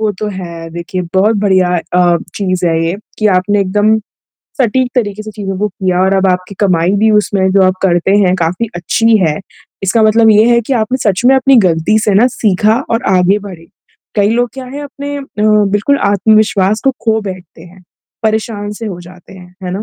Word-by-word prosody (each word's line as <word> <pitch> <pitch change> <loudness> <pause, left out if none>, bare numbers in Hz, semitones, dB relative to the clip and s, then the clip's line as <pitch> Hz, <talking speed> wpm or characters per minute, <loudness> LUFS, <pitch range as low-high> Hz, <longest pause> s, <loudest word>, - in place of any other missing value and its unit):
वो 215 -1 0
तो 215 - -3
है, 170 -3 -8
देखिए 170 +2 -5
बहुत 210 +4 +2
बढ़िया 190 -3 +2 0.2
अ, 175 -1 +3 0.2
चीज़ 185 -3 -2
है 165 0 0
ये 170 +3 -2 0.2
कि 215 - +1
आपने 205 +3 +1
एकदम 210 +3 +1 0.6
सटीक 255 0 +1
तरीके 215 -4 -2
से 215 - -8
चीज़ों 200 -3 -5
को 210 +1 0
किया 185 -2 -2
और 190 +1 +2
अब 190 0 +1
आपकी 180 +2 -3
कमाई 180 -4 +2
भी 220 +2 +3
उसमें 200 -2 +1
जो 195 0 +4
आप 185 0 +3
करते 175 -1 +1
हैं 185 -3 +2
काफ़ी 180 +6 -1
अच्छी 225 +6 +2
है। 155 -2 0 0.5
इसका 195 +4 +1
मतलब 220 +1 +4
ये 215 0 +5
है 235 0 +4
कि - - -2
आपने 245 +1 0
सच 190 +2 -1
में 265 - +6
अपनी 265 0 +3
गलती 170 +5 +2
से 205 - +1
ना 215 +5 +5
सीखा 215 +1 +1
और 230 +1 0
आगे 185 +3 +2
बढ़े। 185 -5 -11 0.5
कई 205 -1 +3
लोग 245 +2 +1
क्या 265 -1 -7
है 275 +3 -7
अपने 285 0 -7
अ, - - -7 0.2
बिल्कुल 210 +5 +2
आत्मविश्वास 215 0 +2
को 270 - +4
खो 220 -1 +1
बैठते 185 -5 -9
हैं, 180 +2 -16 0.4
परेशान 215 -1 -2
से 225 - -4
हो 185 -4 -6
जाते 175 +1 -15
हैं, 180 -1 -15
है 180 - -4
ना? 195 +3 -4
200 Hz, 205 wpm, -13 LUFS, 185-220 Hz, 0.6 s, में